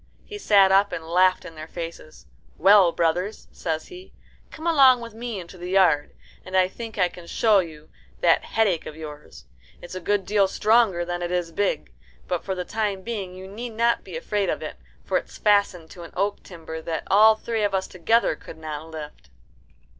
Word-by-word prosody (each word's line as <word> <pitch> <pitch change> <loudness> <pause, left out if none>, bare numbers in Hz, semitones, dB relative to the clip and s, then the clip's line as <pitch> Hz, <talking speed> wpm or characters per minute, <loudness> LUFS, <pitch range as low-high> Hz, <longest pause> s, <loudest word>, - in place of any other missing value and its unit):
He 415 -1 -8
sat 200 - +5
up 200 +1 +4
and 160 - -5
laughed 185 +2 +3
in - - -9
their 155 0 -9
faces. 165 -2 -8 0.3
"Well, 195 0 +6
brothers," 175 +6 -1
says 160 -2 -4
he, 365 +1 -12 0.4
"come 320 - -10
along 270 -7 +6
with 230 -2 -9
me 230 -2 -5
into 180 +1 -11
the 175 +1 -6
yard, 180 -6 +3 0.3
and 185 0 -2
I 185 -1 +4
think 225 +3 -9
I 180 -2 +3
can 175 -1 -13
show 215 +1 +3
you 155 -4 -6 0.3
that 170 -2 +3
headache 200 -7 0
of 150 - -8
yours. 150 -2 -10 0.3
It's 175 - -10
a 185 - -4
good 200 +2 0
deal 205 -1 +3
stronger 210 -3 +2
than 175 0 -4
it 175 - -2
is 175 -2 -1
big, 165 - -2 0.3
but 180 - -2
for 190 - -3
the 180 -1 -4
time 205 -3 -2
being 200 -5 -5
you 190 +1 -9
need 225 +4 -7
not 235 +1 +1
be - - -7
afraid 210 - -1
of - - -2
it, - - -7 0.3
for - - +1
it's - - -13
fastened 200 -6 +2
to 175 - -11
an 170 - -11
oak 200 +2 -1
timber 160 -3 -9
that 160 -1 -4
all 215 +2 +6
three 225 0 -3
of 205 -2 +1
us 190 0 0
together 190 +2 +1
could - - -12
not 155 0 -6
lift." 150 - -9
190 Hz, 200 wpm, -24 LUFS, 170-210 Hz, 0.4 s, Well